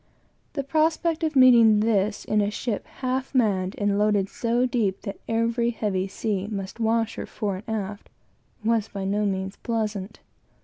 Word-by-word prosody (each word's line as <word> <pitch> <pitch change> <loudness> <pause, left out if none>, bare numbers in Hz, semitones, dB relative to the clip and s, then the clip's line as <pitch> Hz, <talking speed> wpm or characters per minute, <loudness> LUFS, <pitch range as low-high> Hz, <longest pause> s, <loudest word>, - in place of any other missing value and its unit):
The 280 - -2
prospect 320 +3 +1
of 315 -2 0
meeting 235 -5 +7
this 210 -1 +1
in 215 0 +2
a 205 - +1
ship 210 0 -3
half 260 +1 -2
manned, 195 -6 +1
and 205 -1 +1
loaded 205 -2 +2
so 240 +1 0
deep 220 -6 -1
that 200 -2 -6
every 230 +1 +1
heavy 200 -5 -1
sea 200 0 -2
must 200 0 -5
wash 225 0 +1
her - - -5
fore 200 -3 -3
and 220 - -1
aft, 205 0 -6 0.6
was 225 -2 +2
by 195 -1 -5
no 205 +2 0
means 190 0 -3
pleasant. 215 -3 -3
215 Hz, 165 wpm, -25 LUFS, 200-235 Hz, 0.6 s, meeting